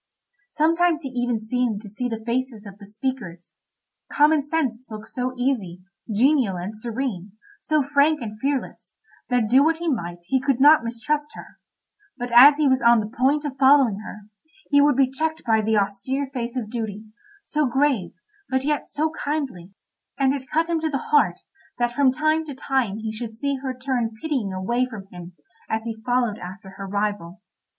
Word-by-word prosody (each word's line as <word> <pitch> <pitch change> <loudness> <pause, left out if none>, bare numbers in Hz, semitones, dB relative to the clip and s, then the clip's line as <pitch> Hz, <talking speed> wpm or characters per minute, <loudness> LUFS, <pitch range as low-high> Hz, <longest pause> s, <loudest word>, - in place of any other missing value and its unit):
Sometimes 330 +1 +2
he 270 - -4
even 245 -2 -1
seemed 220 -1 -1
to - - -9
see 245 +5 -3
the 225 -1 -5
faces 240 -2 -2
of 200 0 -11
the 200 - -12
speakers. 210 -6 -5 0.6
Common 300 +1 +4
Sense 270 -5 -2
looked 215 0 -9
so 255 0 -3
easy, 210 -9 -2 0.3
genial, 240 -3 +2
and 185 +5 -5
serene, 220 -4 -4 0.3
so 305 -2 +1
frank 290 +2 +3
and 215 -4 -7
fearless, 275 +1 -3 0.3
that 245 -3 +2
do 260 +5 +5
what 320 +1 +2
he 340 +1 -5
might 175 - -3
he 265 +8 +1
could 270 -1 0
not 295 -1 +7
mistrust 295 +6 -3
her; - - -12 0.6
but 245 0 -5
as 275 +5 +9
he 305 -2 +2
was 260 -1 +3
on 235 0 +6
the 215 +3 -5
point 285 +3 +2
of 275 -2 -5
following 265 -6 +5
her, 210 0 -9 0.5
he 285 0 +6
would 290 -1 +4
be 270 0 +4
checked 315 +4 -3
by 220 -1 +3
the 220 0 +1
austere 205 +8 -1
face 240 -1 -4
of 220 -4 -4
Duty, 220 -3 -4 0.4
so 300 -2 0
grave, 265 -9 +1 0.4
but 260 0 0
yet 295 +1 -1
so 310 +2 -1
kindly; 275 - -4 0.5
and 270 -1 +2
it 265 -2 -6
cut 325 +2 +1
him 335 -1 0
to 315 0 -1
the 275 -4 -4
heart 185 -12 +3 0.4
that 240 0 0
from 270 0 +4
time 310 +4 +1
to 285 -3 -7
time 260 -7 -1
he 220 0 -4
should 220 0 -6
see 280 +4 -2
her 260 -1 -5
turn 250 -4 -2
pitying 265 -10 -2
away 190 +7 0
from 215 -6 -9
him 175 0 -10 0.4
as 220 0 -1
he 225 -1 -6
followed 245 -3 0
after 190 +2 -9
her 195 0 -8
rival. 205 -2 -3
250 Hz, 185 wpm, -23 LUFS, 215-285 Hz, 0.6 s, as